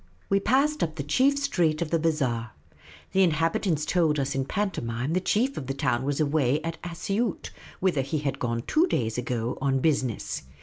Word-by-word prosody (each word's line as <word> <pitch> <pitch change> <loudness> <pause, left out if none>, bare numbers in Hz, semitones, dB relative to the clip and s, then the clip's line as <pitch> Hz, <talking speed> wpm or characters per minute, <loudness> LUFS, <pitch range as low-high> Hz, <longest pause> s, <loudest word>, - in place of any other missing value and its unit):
We 195 - +3
passed 275 +8 +2
up 160 -2 -1
the 145 - -3
chief 265 - +3
street 175 - +1
of 170 -2 -2
the 165 - +2
bazaar. 130 -9 0 0.6
The 190 - +3
inhabit 165 +2 +2
ants 155 -4 +1
told 160 -2 +2
us 140 +1 -1
in 135 0 -1
pantomime 135 - -2
the 185 - +1
chief 245 +9 +1
of 130 - -5
the 135 - -2
town 120 -3 0
was 145 0 -1
away 145 -2 +2
at 165 0 -5
Asioot, 195 +5 -2 0.3
whither 175 -7 +2
he 135 +4 -2
had 145 -2 -2
gone 115 -1 -1
two 325 +4 +3
days 115 - -1
ago 125 0 -2
on 135 -1 +2
business. 130 -5 0
155 Hz, 190 wpm, -26 LUFS, 135-185 Hz, 0.6 s, We